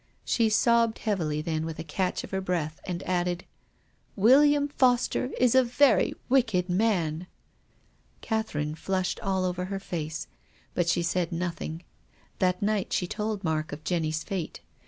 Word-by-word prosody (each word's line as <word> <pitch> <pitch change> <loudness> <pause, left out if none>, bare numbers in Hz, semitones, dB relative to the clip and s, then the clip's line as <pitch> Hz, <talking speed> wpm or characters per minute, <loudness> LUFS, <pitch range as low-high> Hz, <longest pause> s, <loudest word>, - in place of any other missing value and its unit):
She 230 -2 +2
sobbed 230 +1 +3
heavily, 160 -8 -1
then 160 -1 -1
with 160 -1 -5
a - - -5
catch 180 +4 -2
of - - -9
her 190 -1 -1
breath, 170 -4 -2
she 180 0 -4
added, 180 -1 -1 0.4
" - - -39
William 290 +3 +6
Foster 250 -3 +2
is 250 -2 +4
a 260 0 +6
very 255 +3 +3
wicked 225 -9 +2
man." 180 -4 0 0.9
Catherine 155 -10 -2
(lushed 190 -1 0
all 190 -1 0
over 180 0 -2
her 195 +1 -4
face. 160 -5 -4 0.5
But 175 -1 +1
she 170 - +2
said 175 0 0
nothing. 170 -1 -4 0.6
That 180 +1 +1
night 210 -2 0
she 180 - +1
told 210 +2 -3
Mark 155 -2 -1
of 145 +1 -7
Jenny's 160 -3 -1
fate. 190 -6 -4
185 Hz, 155 wpm, -27 LUFS, 165-220 Hz, 0.9 s, William